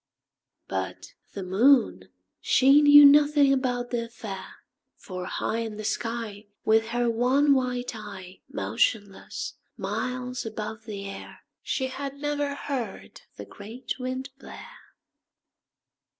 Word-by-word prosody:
But - - -5 0.2
the 195 - -5
Moon, 235 +8 +3 0.3
she 275 +3 +5
knew 290 0 +9
nothing 290 -1 +6
about 245 -2 -1
the 235 -1 -1
affair, 215 -5 -8 0.4
For 185 -1 -7
high 220 +4 -2
In 220 -2 -4
the 215 - -6
sky, 220 -1 -4 0.2
With 220 0 +3
her 240 +1 0
one 255 +5 +3
white 250 -2 -1
eye, 195 -4 -9
Motionless, 195 - -2 0.2
miles 250 +5 -3
above 220 0 -6
the 200 -3 -6
air, 195 - -9 0.2
She 265 - -2
had 275 +1 -5
never 290 0 -2
heard 255 -8 -5 0.2
the - - -7
great 235 +5 -7
Wind 255 +2 -4
blare. - - -13
240 Hz, 120 wpm, -26 LUFS, 210-270 Hz, 0.4 s, knew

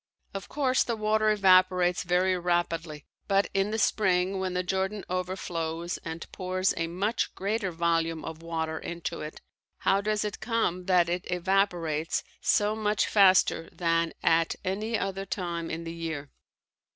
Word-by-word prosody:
Of 195 0 -6
course, 260 -3 +2
the 235 - -2
water 215 0 +2
evaporates 185 -3 +4
very 180 +1 +2
rapidly, 170 -3 -1 0.2
but 195 0 +2
in 195 +1 +1
the 220 - -2
spring 190 -3 +2
when 185 -1 -2
the 180 - 0
Jordan 190 +2 -2
overflows 175 -2 -3
and 165 0 -6
pours 185 0 0
a 165 - -1
much 200 +7 -1
greater 200 +1 -1
volume 165 -1 0
of 160 0 -7
water 160 -1 -3
into 170 0 -5
it, 150 +1 -7 0.4
how 195 - +3
does 210 0 0
it 210 - -4
come 205 -6 -1
that 180 -2 +4
it 175 +1 -3
evaporates 175 -4 0 0.2
so 210 +1 +2
much 210 -1 +1
faster 190 -4 +4
than 165 -1 0
at 165 0 +3
any 215 +5 -1
other 195 0 -3
time 170 -3 -3
in 165 +1 -4
the 165 0 -6
year? 160 -4 -5
185 Hz, 150 wpm, -28 LUFS, 165-195 Hz, 0.4 s, evaporates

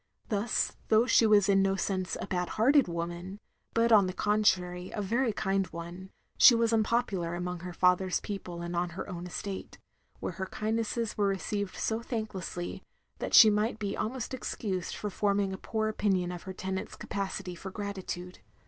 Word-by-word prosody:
Thus, 215 +1 0
though 220 +2 +5
she 230 -2 +5
was 205 -2 +5
in 195 -1 +4
no 195 0 +2
sense, 190 -1 -2
a - - -3
bad 180 -1 -2
hearted 275 +4 +5
woman, 175 +3 -4 0.4
but 230 0 +3
on 205 -4 +7
the 185 - -3
contrary 185 -4 +1
a - - -5
very 230 +5 +1
kind 195 -2 0
one, 170 +3 -8 0.3
she 245 - +9
was 230 0 +2
unpopular 215 -6 +1
among 180 0 -3
her 180 +1 -6
father's 180 +1 +2
people 180 -4 -6
and 175 0 -4
on 175 0 0
her - - -4
own 180 -2 -6
estate; 190 +2 -6 0.4
where - - -3
her 190 - -1
kindnesses 225 +1 -2
were 205 - +3
received 195 0 -2
so 225 +1 -1
thanklessly 210 -7 -4 0.4
that - - 0
she 220 -2 +10
might 210 +2 0
be 205 -2 -3
almost 250 +2 -3
excused 195 -7 -3
for 210 - -4
forming 200 0 +1
a - - -4
poor 220 -1 -1
opinion 190 -4 0
of 175 -1 -6
her 190 - -5
tenants' 190 0 -4
capacity 195 -2 -4
for 185 +3 -7
gratitude. 190 -3 -6
195 Hz, 175 wpm, -30 LUFS, 180-215 Hz, 0.4 s, she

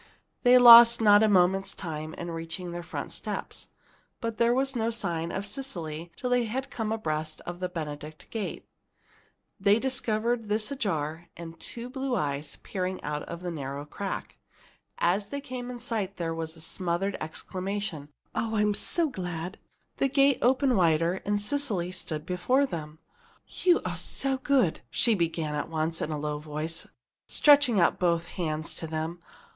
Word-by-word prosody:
They 250 0 +7
lost 235 -1 +10
not 205 -2 +6
a 220 - +4
moment's 195 0 +3
time 155 -3 -5
in 175 0 -5
reaching 165 +2 -5
their 175 0 -5
front 170 - -6
steps. - - -5 0.5
But 230 -2 -3
there 235 +1 +4
was 270 +2 +1
no 225 -1 +1
sign 170 -7 -2
of 195 - -3
Cecily 170 - -5
till 250 - -3
they 245 -1 +3
had 265 +5 -4
come 220 -2 -3
abreast 155 -7 -2
of 175 0 -7
the 180 -1 -2
Benedict 155 -2 -6
gate. 220 -3 -4 0.9
This 200 +1 +5
they - - 0
discovered 235 -3 -1
ajar, 195 - -1
and 165 -1 -9
two 235 0 -5
blue 265 0 -2
eyes 145 -4 -2
peeping 185 -1 -3
out 150 0 -3
of 170 +1 -7
a 175 - -3
narrow 140 -2 -5
crack. 195 +6 -5 0.6
As 195 +4 +1
they 280 - -3
came 250 -3 -6
in 250 - -5
sight, 220 -5 -3
there 165 -2 -2
was 165 0 -5
a - - -11
smothered 185 +3 -1
exclamation, 185 -1 -4 0.2
"Oh! 225 0 -1
I'm 210 -1 +3
so 335 - +2
glad!" 180 - -5 0.4
The 275 - +2
gate 275 0 +4
opened 260 0 +3
wider, 170 +1 +2
and 205 0 +2
Cecily 205 -7 0
stood 160 -4 -4
before 215 +11 +2
them. 155 - -6 0.5
"You 355 -2 +2
are 175 -2 -3
so 265 +10 0
good!" 260 - +2
she 235 - +3
began 165 -5 -1
at 150 +2 -3
once, 160 0 -1
in - - -2
a 155 - -2
low 150 0 -3
voice, 155 +2 -4 0.4
stretching 285 -7 +5
out 170 - +3
both 170 -2 +2
hands 155 -3 -3
to 165 - -4
them. 160 +2 -3
185 Hz, 165 wpm, -28 LUFS, 165-235 Hz, 0.9 s, lost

